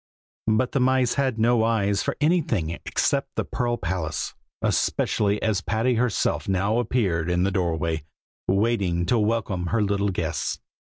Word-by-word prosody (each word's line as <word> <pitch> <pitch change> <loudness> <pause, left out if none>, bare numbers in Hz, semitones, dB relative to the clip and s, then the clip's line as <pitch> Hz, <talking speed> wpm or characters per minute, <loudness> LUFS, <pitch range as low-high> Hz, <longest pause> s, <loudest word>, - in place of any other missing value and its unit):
But 110 +3 +2
the 140 - +1
mice 130 -1 +3
had 135 -4 0
no 115 0 +3
eyes 100 -3 +1
for - - -2
anything 150 - +1 0.2
except - - 0
the - - -1
pearl 120 -1 -1
palace, 80 -6 -3 0.3
especially 105 0 +1
as 110 -3 +1
Patty 110 +5 +1
herself 120 -2 0
now 100 +4 +1
appeared 95 -9 0
in 90 0 +2
the 100 - +1
doorway, 80 -4 -1 0.4
waiting 95 -4 +1
to 120 +5 +2
welcome 105 -5 0
her 115 +3 +1
little 100 0 +1
guests. 80 -5 -2
105 Hz, 150 wpm, -24 LUFS, 90-120 Hz, 0.4 s, mice